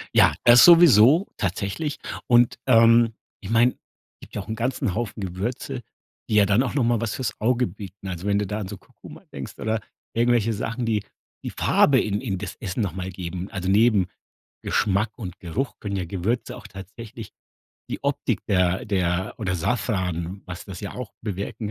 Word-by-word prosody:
Ja, - - +6
das 120 0 +8
sowieso, 165 - +7
tatsächlich 100 - -2 0.3
und, 120 -1 +4
ähm, 115 -1 +5 0.3
ich 100 - -8
meine, 120 +2 +3 0.4
gibt - - -13
ja 105 - -2
auch 95 - -12
'n 110 - -3
ganzen 120 -4 -1
Haufen 110 -2 -3
Gewürze, 120 +8 -4 0.5
die 105 - +1
ja 105 -1 +6
dann 105 +6 +3
auch 125 - -3
noch 140 -4 +1
mal 120 -1 +2
was 115 -3 -2
fürs 130 - -4
Auge 125 +2 +2
bieten. 95 +1 -10
Also, 95 +1 -5
wenn 100 0 +2
du 105 - -2
da 105 +2 -3
an 95 - -4
so 100 0 -7
Kurkuma - - -15
denkst 65 -2 -8
oder 110 0 -1 0.3
irgendwelche 115 -1 +2
Sachen, 115 +3 -3
die 105 -3 0 0.4
die - - -4
Farbe 135 -3 +3
in 105 +1 -2
in 100 -8 -2
das 95 0 -6
Essen 100 +2 -3
noch 95 -5 -1
mal 95 0 -5
geben. 90 +1 -6
Also, 95 -1 -3
neben 105 -2 +4 0.6
Geschmack 105 +1 +1
und 90 -6 -7
Geruch 105 +11 -4
können 100 -2 -4
ja 90 -2 -2
Gewürze 100 +7 -2
auch - - -11
tatsächlich 110 +3 -10 0.6
die - - -4
Optik - - -1
der 90 0 +1
der 95 -1 -1
oder 95 -4 -2
Safran, 95 -3 -2
was 90 0 -8
das 95 -2 -8
ja 100 - -6
auch 125 -4 -7
bewirken 105 +1 -4
105 Hz, 185 wpm, -24 LUFS, 95-120 Hz, 0.6 s, das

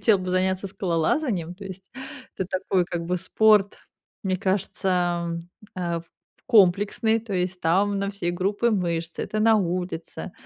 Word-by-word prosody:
хотела 215 -4 +4
бы 185 0 -4
заняться 190 +1 +1
скалолазанием, 180 - -1
то 200 +2 -11
есть 190 0 -9 0.5
это 190 - -2
такой, 185 -2 +1
как 170 -1 -4
бы, 180 +1 0
спорт, 210 +2 +3 0.4
мне 185 -2 0
кажется, 190 +1 -1 0.9
эм, 170 -2 -1
э, - - -7 0.5
комплексный, 210 +1 +4
то 220 -2 -8
есть 180 0 -1
там 195 +5 +2
на 200 0 -1
все 190 -4 -2
группы 200 +6 +1
мышц, 170 -5 -1
это 215 - -3
на 225 +1 +5
улице. 180 -1 -3
190 Hz, 150 wpm, -25 LUFS, 175-205 Hz, 0.9 s, на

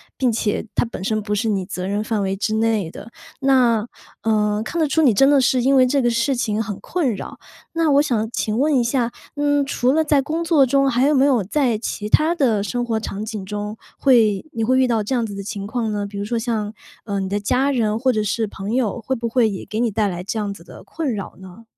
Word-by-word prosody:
并 255 -3 +1
且 215 -1 -1
它 - - +2
本 225 -5 -7
身 215 +2 0
不 210 0 -2
是 220 +2 0
你 195 -3 -1
责 185 -1 -5
任 205 +2 -1
范 215 -2 -1
围 195 0 -1
之 215 +2 -1
内 220 -6 0
的。 230 - -11 0.3
那 245 -5 +3 0.3
呃， 210 -1 +1
看 335 +9 -4
得 315 - +2
出 320 - +1
你 280 -6 +5
真 270 +7 +5
的 285 -2 +5
是 255 0 +2
因 270 +2 +3
为 255 -1 +5
这 275 0 +1
个 240 - +3
事 230 +4 +1
情 220 -3 -1
很 205 -3 -5
困 280 - -1
扰。 - - -8 0.3
那 330 -1 +1
我 285 - +6
想 230 -7 0
请 215 -2 -2
问 295 0 +3
一 245 - +3
下， 235 0 0 0.3
嗯， 290 -1 +2
除 255 -2 +1
了 320 0 +3
在 290 -2 +3
工 320 +4 -2
作 320 -5 +4
中， 275 +1 +2
还 255 +2 +2
有 300 - +3
没 270 - +4
有 255 -8 +3
在 245 +1 +1
其 210 -1 -4
它 315 +7 +3
的 235 -10 +2
生 245 +3 -2
活 225 -2 -1
场 205 -1 -5
景 215 -3 -5
中， 210 +2 -5 0.2
会 225 -6 +3
你 225 - -2
会 255 +2 +3
遇 260 - +4
到 230 -2 +1
这 210 +5 -2
样 235 - 0
子 210 - -6
的 200 - -5
情 200 0 -5
况 225 +1 -2
呢？ 205 -1 -2
比 200 0 -8
如 200 - -3
说 235 +2 -2
像， 220 -2 -2 0.3
呃， 200 -2 -2
你 190 - -3
的 205 +1 -1
家 255 +7 +1
人 220 -4 0
或 260 +3 +2
者 215 -3 0
是 220 +2 -1
朋 200 +1 -5
友， 240 -2 0
会 265 +4 -2
不 235 -1 -3
会 230 -2 +3
也 195 - -5
给 215 - -4
你 235 0 +2
带 215 0 0
来 175 -1 -5
这 200 +4 -4
样 205 -2 -2
子 200 - -14
的 - - -13
困 290 -8 -3
扰 200 - -6
呢？ 190 +4 -13
230 Hz, 280 characters per minute, -21 LUFS, 210-265 Hz, 0.3 s, 我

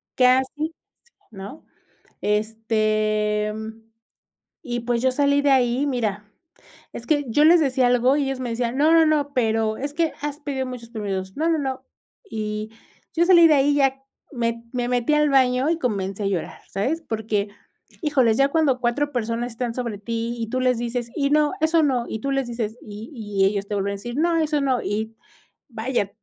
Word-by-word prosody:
Casi, 265 +5 +2 0.6
¿no? 200 +8 -10 0.6
Este, 215 0 0 1.1
y, 240 -1 -3
pues, 235 0 -1
yo 260 - +3
salí 285 +1 +2
de 285 - +3
ahí, 255 +1 +2
mira 215 -6 -2 0.7
es 235 - -7
que 290 -2 +2
yo 265 +6 +3
les 335 +2 +7
decía 260 -4 +2
algo, 245 +2 +3
y 290 - +1
ellos 270 -1 -3
me 250 -2 -3
decían: 235 +2 -2
"No, 310 +3 +4
no, 325 -1 +6
no. 290 -2 +1
Pero 220 -2 +1
es 285 +2 -4
que 330 0 0
has 295 0 -4
pedido 275 -3 -3
muchos 250 -2 -8
permisos. 195 -4 -4
No, 325 +2 +1
no, 325 - +2
no". 265 -1 -4 0.4
Y 215 -2 -4 0.4
yo 340 +1 +3
salí 345 -2 +7
de 305 - +6
ahí, 285 +1 +3
ya 270 -1 +2 0.3
me 230 -3 -2
me 245 -1 -1
metí 250 +3 +1
al 300 0 +3
baño 260 0 +3
y 330 - +1
comencé 200 - -2
a - - -1
llorar, 190 -4 -3
¿sabes? 265 - -1
Porque, 215 -6 -2 0.5
híjoles, 260 -8 +2
ya 275 0 +4
cuando 285 -5 +2
4 285 +5 0
personas 235 0 -2
están 230 0 -3
sobre 235 -5 -4
ti, 230 +2 -3
y 225 - -2
tú 255 +1 -1
les 255 -1 +2
dices: 240 0 -3
"Y 280 -2 +1
no, 300 0 +3
eso 320 0 +3
no". 255 -4 +1
Y 220 - -4
tú 275 +5 -2
les 270 -2 0
dices 230 -2 -4
Y 215 +5 -9
y 205 -5 -1
ellos 200 0 0
te 210 - -3
vuelven 200 0 -1
a - - -3
decir: 240 +5 -7
"No, 335 +2 +2
eso 305 -2 +1
no". 260 -3 +1
Y, 220 +2 -3 0.5
vaya, 230 -3 -2
245 Hz, 190 wpm, -23 LUFS, 220-285 Hz, 1.1 s, les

